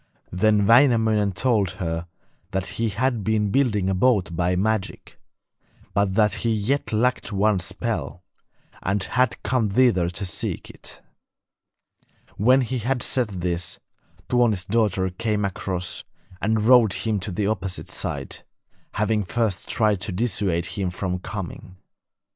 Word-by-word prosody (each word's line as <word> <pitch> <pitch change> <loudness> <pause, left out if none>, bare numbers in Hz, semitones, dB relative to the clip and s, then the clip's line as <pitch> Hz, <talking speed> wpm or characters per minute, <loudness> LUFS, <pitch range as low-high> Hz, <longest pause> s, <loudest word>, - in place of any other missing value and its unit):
Then 105 +2 +3
Wainamoinen 110 -4 +4
told 100 -3 +1
her 85 -2 -3 0.4
that 95 0 -2
he 115 +3 -2
had 115 +2 -1
been 105 -1 +1
building 105 -7 +2
a 95 - +1
boat 95 -4 +2
by 90 +2 +1
magic, 105 +1 -2 0.7
but 100 -2 +1
that 105 -1 +3
he 115 - +1
yet 110 +7 0
lacked 120 +2 0
one 100 0 +2
spell, 90 +1 -4 0.6
and 95 0 0
had 125 +2 0
come 115 -4 +1
thither 95 -6 +3
to 95 +3 -4
seek 90 - -4
it. - - -9 1.3
When 130 +6 +4
he 125 +1 -2
had 125 +2 -1
said 125 -3 0
this, 85 -1 -2 0.5
Tuoni's 115 -7 +2
daughter 100 -3 +1
came 105 +1 -1
across 90 -2 -3 0.4
and 110 +1 +1
rowed 115 -4 +6
him 110 -2 -1
to 95 +2 -4
the 100 +3 -1
opposite 95 -3 -2
side, - - -4 0.5
having 105 +1 +1
first 100 0 -1
tried 105 -4 +2
to 105 - -2
dissuade 95 -4 0
him 95 0 -2
from 90 0 -3
coming. 95 -1 -7
105 Hz, 135 wpm, -23 LUFS, 95-115 Hz, 1.3 s, rowed